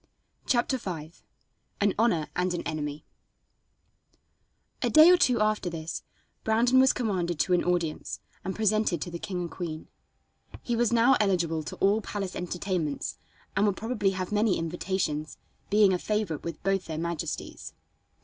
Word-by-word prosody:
CHAPTER 255 +1 +1
V 165 -6 -6 0.7
An 205 -1 +3
Honor 175 -10 +2
and 180 0 0
an - - -4
Enemy 150 0 -4 1.8
A - - +1
day 310 +3 +8
or - - +8
two 250 -8 +3
after 215 -3 +1
this, 165 -1 -5 0.4
Brandon 235 +4 +4
was 265 0 +6
commanded 185 -8 -1
to 180 - +1
an 175 - +3
audience, 175 -3 -1 0.2
and 190 +1 -3
presented 215 -4 +1
to 175 - -7
the 170 - -5
king 180 -1 -4
and 170 - -5
queen. 160 -3 -6 0.7
He 240 - -1
was 235 0 +2
now 235 +3 +5
eligible 175 -6 +1
to 155 - -7
all 205 +3 +2
palace 200 -2 -4
entertainments, 180 - -3 0.4
and 200 +2 +3
would 200 - 0
probably 225 -3 0
have 185 0 -3
many 210 -1 +2
invitations, 165 -2 -2 0.3
being 205 -2 +5
a 180 - 0
favorite 210 -8 -2
with 165 -2 -6
both 195 -1 +1
their 160 -1 -5
majesties. 170 -1 -4
185 Hz, 155 wpm, -28 LUFS, 170-215 Hz, 1.8 s, day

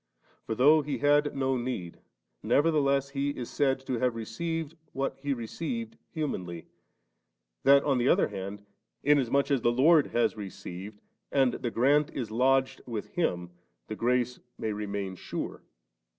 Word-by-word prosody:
For 110 - -1
though 150 +6 +6
He 145 0 -3
had 145 +1 +3
no 135 -1 +1
need, 120 -9 -4 0.4
nevertheless 140 -3 +2
He 140 0 -1
is 120 - -5
said 135 -2 +1
to 125 -3 -2
have 125 -1 +1
received 160 +8 -4 0.2
what 135 0 -2
He 145 +1 -2
received 170 - -4
humanly, 90 - -4 1.0
that 140 0 +7
on 135 -3 +2
the 120 - +1
other - - +4
hand, 100 0 -6 0.4
inasmuch 140 0 +3
as 135 -3 +2
the 120 - +3
Lord 150 +5 +5
has 120 - +1
received, 100 0 -8 0.3
and 135 -3 +3
the 120 - -3
grant 140 +6 +3
is 120 -5 -3
lodged 130 +3 +2
with 115 -4 -4
Him, 90 - -1 0.3
the 110 - -5
grace 125 +1 0 0.2
may 110 - -2
remain 100 -2 -3
sure. - - -5
130 Hz, 150 wpm, -29 LUFS, 110-145 Hz, 1.0 s, that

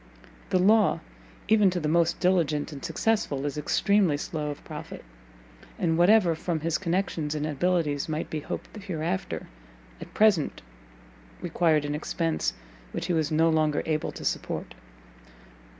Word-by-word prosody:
The - - +3
law, 205 -1 +4 0.5
even 210 -3 +5
to 180 -1 -2
the 155 - -2
most 170 +1 +2
diligent 165 -5 +1
and 140 -2 -9
successful, 165 -5 0
is 145 - -2
extremely 180 +2 +2
slow 150 0 -4
of 145 - -7
profit, - - -8 0.7
and 165 -2 +1
whatever, 175 +1 +5
from 160 0 -3
his 165 0 0
connections 170 -4 -1
and 150 0 -2
abilities 155 -1 0
might 155 0 -2
be 155 - -3
hoped 150 - -7
hereafter, 175 - -3 0.6
at - - -9
present 210 -8 +3 0.8
required 155 - +1
an 145 - -2
expence 160 +2 -1 0.4
which - - -3
he 180 - 0
was 160 -2 +1
no 160 +1 +3
longer 155 -2 +1
able 155 -1 -1
to - - -8
support. - - -3
165 Hz, 145 wpm, -27 LUFS, 150-180 Hz, 0.8 s, even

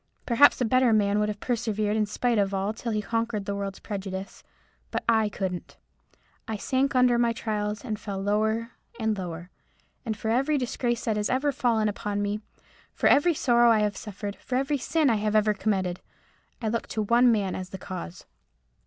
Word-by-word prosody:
Perhaps 250 +4 +5
a 250 - +2
better 255 +1 +3
man 205 -1 +3
might 210 0 +1
have 205 -1 -4
persevered 215 -3 -1
in 215 -1 +1
spite 235 +2 0
of 200 -1 +1
all 195 +2 -1
till 230 +1 -4
he 210 -1 -1
conquered 230 -2 -2
the 200 - -2
world's 200 -1 -4
prejudice. 195 -2 -6 0.5
But - - -3
I 220 -2 +3
couldn't. 185 -3 -5 0.7
I 220 - -3
sank 265 +5 0
under 250 -1 +4
my 235 -1 +2
trials, 210 0 -3
and 215 -4 -3
fell 205 -2 -5
lower 220 +3 0 0.3
and 220 -1 +1
lower. 175 -2 -6 0.5
And 220 -3 -3
for 220 - -3
every 275 +5 +2
disgrace 240 -2 -2
that 220 -2 0
has 210 +1 0
ever 275 +3 +1
fallen 235 -5 +1
upon 205 0 -3
me—for 205 +1 -6
every 325 +4 +5
sorrow 240 -3 +4
I 220 -2 +4
have 210 -1 +2
ever 195 - -14
suffered—for 205 +3 -6
every 275 +2 0
sin 310 +4 +1
I 230 -4 +3
have 210 0 -1
ever 215 0 +4
committed—I 195 +2 -4
look 230 +1 -1
to 215 - -2
one 240 +3 +5
man 200 -4 0
as 185 0 -5
the 190 - -7
cause." 180 -2 -7
215 Hz, 190 wpm, -26 LUFS, 205-235 Hz, 0.7 s, Perhaps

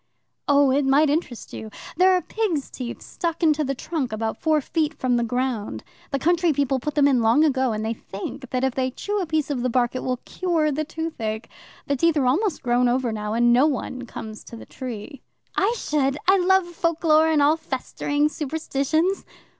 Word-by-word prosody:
"Oh, 285 -1 +5
it 280 +2 +2
might 280 +2 +4
interest 290 -6 -3
you. 220 - -7 0.3
There 370 +3 +5
are 360 - 0
pigs' 375 -11 -2
teeth 245 -2 -6
stuck 340 -1 -4
into 305 -1 +3
the 275 -1 -2
trunk, 275 -2 -3
about 220 0 -3
four 310 -2 +3
feet 315 +2 -1
from 255 -1 0
the 235 - +1
ground. 245 -2 -2 0.3
The 275 - -1
country 340 +3 +2
people 270 -1 +1
put 295 +3 -4
them 285 -2 +5
in 260 -4 +3
long 230 +7 +4
ago, 265 -5 +2
and 215 0 -3
they 225 - -1
think 235 +5 -8
that 255 0 -1
if 265 -1 +1
they 260 0 0
chew 410 +10 -3
a 360 - -3
piece 310 -2 0
of 260 -4 -1
the 255 - 0
bark, 240 0 +1
it 255 - -3
will 255 -1 -1
cure 330 -5 0
the 305 +2 -1
toothache. 250 -9 -4 0.4
The 280 - 0
teeth 335 +3 +2
are 275 - +2
almost 320 - +1
grown 245 0 +3
over 245 -1 0
now, 210 -1 -3
and 240 +1 +4
no 260 +5 +5
one 255 -3 -3
comes 215 -1 -8
to - - -10
the 225 - -10
tree." 255 +2 -7 0.3
"I 395 +3 +2
should. 280 -5 0
I 385 +1 +6
love 380 0 +4
folklore 330 -2 +2
and 315 -2 +3
all 290 +2 +5
festering 290 0 -1
superstitions." 310 +4 -1
280 Hz, 205 wpm, -23 LUFS, 250-320 Hz, 0.4 s, I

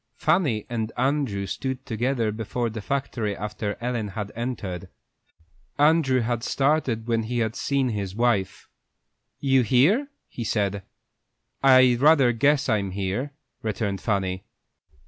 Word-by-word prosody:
Fanny 150 - +1
and 115 -2 -3
Andrew 130 -6 0
stood 130 +5 -4
together 115 0 -1
before 115 +2 -3
the 110 0 -6
factory 120 -5 -2
after 105 0 -4
Ellen 120 -3 -2
had 105 +1 -5
entered. 110 -7 -4 0.9
Andrew 145 -4 +4
had 120 0 -1
started 135 -6 +1
when 115 -1 +1
he 120 +2 -3
had 110 -2 -1
seen 140 -2 0
his 100 -4 -4
wife. 115 -5 0 0.7
"You 135 -2 +3
here?" 145 - +3 0.2
he 120 - -6
said. 100 -3 -1 0.8
"I 130 -2 +6
rather 140 -3 +5
guess 140 +4 +2
I'm 105 -5 +1
here," 100 +9 -3 0.3
returned 105 -2 -2
Fanny. 95 -3 -1
120 Hz, 125 wpm, -25 LUFS, 105-135 Hz, 0.9 s, I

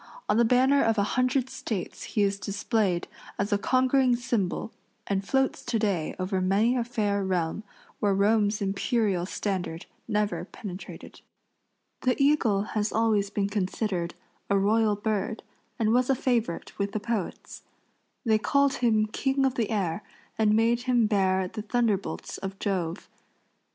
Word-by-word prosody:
On - - +2
the 235 - +5
banner 260 +4 +4
of 225 -1 +2
a 200 - +3
hundred 255 +1 +1
States 215 -7 -5
he 210 - 0
is 200 0 0
displayed 200 -2 0 0.3
as 200 +1 0
a 205 - +2
conquering 255 +2 +3
symbol 235 -4 -2 0.3
and 195 -1 -1
floats 265 +6 0
to 230 - 0
day 195 -7 -1
over 185 +1 -1
many 205 +6 +2
a 245 - +1
fair 210 -4 -1
realm 185 +1 -1 0.4
where 200 -2 +2
Rome's 205 +1 +2
imperial 195 -2 0
standard 185 -5 -3 0.2
never 210 -1 0
penetrated. 190 -3 -9 0.8
The 255 +1 +1
eagle 275 -9 +3
has 215 0 0
always 215 -3 +2
been 200 -1 -1
considered 190 -3 -2 0.3
a 200 - +3
royal 210 +2 +3
bird, 215 +1 -2 0.3
and 220 -1 +2
was 250 +1 +2
a 270 - +4
favorite 235 -9 -1
with 200 0 -1
the 215 - -1
poets. 210 -3 -4 0.6
They 220 -2 +3
called 280 +4 +2
him 220 -3 +3
king 270 +5 0
of 265 - +1
the 230 -5 -1
air 195 -4 -1 0.3
and 215 -1 +3
made 230 +2 +3
him 240 -3 +4
bear 190 -3 +2
the 215 +3 -6
thunderbolts 215 -2 -1
of 195 0 -5
Jove. 185 -3 -2
210 Hz, 150 wpm, -27 LUFS, 195-235 Hz, 0.8 s, the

